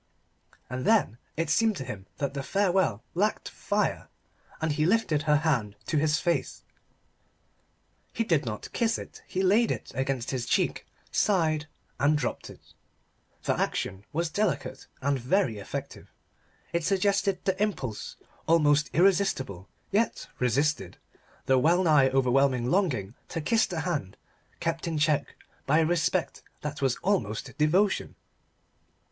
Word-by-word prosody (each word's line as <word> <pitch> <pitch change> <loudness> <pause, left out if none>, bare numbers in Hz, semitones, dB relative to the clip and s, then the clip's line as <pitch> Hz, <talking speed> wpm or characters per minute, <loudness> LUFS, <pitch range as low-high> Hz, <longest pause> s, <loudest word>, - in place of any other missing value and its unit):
And 130 +1 -4
then 210 - +2 0.2
it 165 -1 0
seemed 220 +1 +3
to 135 - -4
him 100 -6 -7
that 140 -1 -2
the 140 - -3
farewell 185 - +1
lacked 205 +5 0
fire: - - -1 0.5
and 160 0 0
he 150 +1 0
lifted 170 -5 +2
her 150 -1 +3
hand 135 -10 +1
to 155 - 0
his 150 +1 +2
face. 170 -1 -1 1.5
He 230 - -1
did 165 -9 +2
not 105 -3 -6
kiss 230 -1 +1
it. - - -10
He 190 - -1
laid 215 +5 +4
it - - -4
against 130 -1 -2
his 125 -3 -3
cheek, - - 0 0.2
sighed, 160 -6 +1 0.3
and 150 +2 +3
dropped 125 -5 -3
it. - - -16 0.7
The - - +1
action 95 +1 -2
was 165 +1 -1
delicate 180 -9 -2 0.2
and 140 -1 +1
very 125 - +1
effective. 100 - -7 0.6
It 170 -1 0
suggested 195 +1 +2
the 190 +1 0
impulse, 130 - -2 0.3
almost 150 -2 +4
irresistible 165 - +1 0.2
yet 215 +3 0
resisted, 125 - 0 0.5
the 130 -1 +4
well 170 +7 +3
nigh 150 -6 +5
overwhelming 130 -1 +2
longing 135 - +1 0.2
to 165 - -3
kiss 220 +9 +2
the 170 -5 -3
hand, 145 - -3 0.4
kept 165 0 -2
in 165 -2 -1
check 150 -1 +1 0.3
by 145 +3 +4
a 165 - +4
respect 175 +1 0 0.2
that 150 -1 -5
was 135 -3 +2
almost 115 - -1
devotion. 180 +7 +2
155 Hz, 140 wpm, -28 LUFS, 130-185 Hz, 1.5 s, nigh